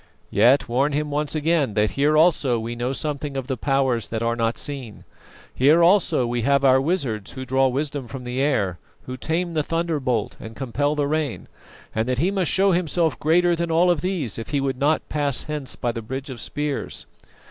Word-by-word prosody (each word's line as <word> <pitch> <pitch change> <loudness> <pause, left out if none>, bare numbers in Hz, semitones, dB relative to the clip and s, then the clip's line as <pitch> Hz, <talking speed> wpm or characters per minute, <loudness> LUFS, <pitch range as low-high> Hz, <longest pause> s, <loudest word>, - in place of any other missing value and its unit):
Yet 120 +7 +4
warn 135 +5 +1
him 150 +1 -1
once 150 +1 -1
again 155 -7 +1
that 105 0 +2
here 150 +2 +2
also 150 -7 +3
we 115 +1 -4
know 120 +2 -2
something 145 0 -3
of 135 - -3
the 130 0 -2
Powers 130 -3 0
that 115 0 -3
are 115 0 0
not 115 0 -1
seen, 135 -7 -5 0.5
here 150 +6 +4
also 175 -8 +3
we 120 0 -1
have 140 +3 +2
our 130 0 +5
wizards 135 - -2
who 130 -1 -6
draw 130 +1 +2
wisdom 140 0 -3
from 125 +2 -8
the 125 +1 -4
air, 100 -11 0 0.2
who 130 - -6
tame 165 +6 -2
the 155 - +1
thunderbolt 150 -9 -1
and 110 0 -9
compel 145 +3 -1
the 145 -1 0
rain, 150 -3 -2 0.5
and 110 +3 -1
that 125 - 0
he 175 +8 +1
must 190 -4 +1
show 195 +1 +3
himself 170 -6 0
greater 175 +3 +3
than 170 0 -2
all 170 +2 +4
of 165 -4 0
these 165 - -2
if 115 - -7
he 145 - 0
would 135 -1 -2
not 150 +3 +1
pass 145 -4 -1
hence 150 -4 -4
by 120 - -1
the 115 -1 -5
bridge 130 +5 -6
of 120 - -7
spears. 145 -1 -4
140 Hz, 205 wpm, -23 LUFS, 125-155 Hz, 0.5 s, our